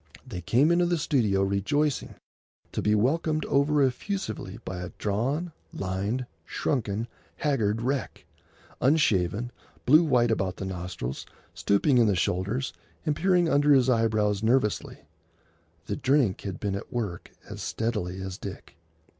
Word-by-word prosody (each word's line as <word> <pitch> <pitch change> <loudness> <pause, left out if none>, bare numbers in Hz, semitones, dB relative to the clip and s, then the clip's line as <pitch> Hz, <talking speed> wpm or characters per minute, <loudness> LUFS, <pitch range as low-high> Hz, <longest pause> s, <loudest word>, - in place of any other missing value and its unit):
They 90 - -6
came 125 - +3
into 175 0 +3
the 175 0 +1
studio, 120 - +2
rejoicing, 115 +10 0 0.6
to - - -2
be 105 0 +3
welcomed 155 +7 +1
over 140 +1 +3
effusively 135 - -2
by 95 -1 -4
a 90 - -5
drawn, 135 - -1 0.2
lined, 100 +7 -2 0.2
shrunken, 110 - -2 0.3
haggard 115 -6 0
wreck,—unshaven, 125 - -1 0.3
blue 155 +6 +7
white 120 -7 +3
about 95 -4 0
the 95 - -4
nostrils, 90 -8 -5 0.3
stooping 120 +6 +2
in 115 - +5
the 100 - +2
shoulders, 100 +9 -1 0.3
and 150 -2 +1
peering 180 0 +3
under 145 -1 +4
his 130 -1 +4
eyebrows 110 -3 +2
nervously. 110 -1 +1 0.8
The - - -3
drink 130 -7 +2
had 95 -3 -5
been 100 -2 -2
at 100 - -6
work 105 -8 -4 0.2
as - - -7
steadily 95 -5 -2
as 95 0 -6
Dick. 100 - -9
115 Hz, 135 wpm, -27 LUFS, 100-145 Hz, 0.8 s, blue